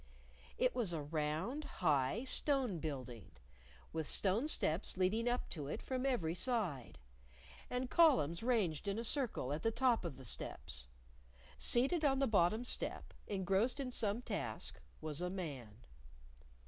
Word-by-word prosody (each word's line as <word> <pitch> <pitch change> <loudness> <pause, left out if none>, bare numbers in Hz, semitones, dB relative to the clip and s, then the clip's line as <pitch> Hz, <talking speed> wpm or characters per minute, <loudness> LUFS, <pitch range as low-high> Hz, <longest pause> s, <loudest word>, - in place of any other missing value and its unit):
It 255 - +2
was 225 -8 -1
a 160 - -2
round, 155 - -2
high, 155 - +1
stone 265 - +1
building, 130 - -5 0.6
with 160 -2 -2
stone 210 +8 +2
steps 180 - 0
leading 215 +6 +2
up 245 +1 -1
to 150 -5 -3
it - - -3
from 260 0 -2
every 180 -12 +1
side, 180 - -1 0.7
and 250 +1 -1
columns 255 - +4
ranged 210 - +1
in 200 +1 0
a 230 - -2
circle 235 - +1
at 150 - -2
the 225 - +2
top 245 0 +2
of 165 -7 -5
the 130 - -10
steps. 65 - -4 0.7
Seated 275 +7 +2
on 275 -2 +4
the 275 - +3
bottom 215 +1 +3
step, - - -3
engrossed 195 +7 +1
in 260 -2 -2
some 220 0 +1
task, 200 - -3 0.2
was 155 0 -3
a 180 - -1
man. 140 - -6
195 Hz, 150 wpm, -37 LUFS, 155-250 Hz, 0.7 s, columns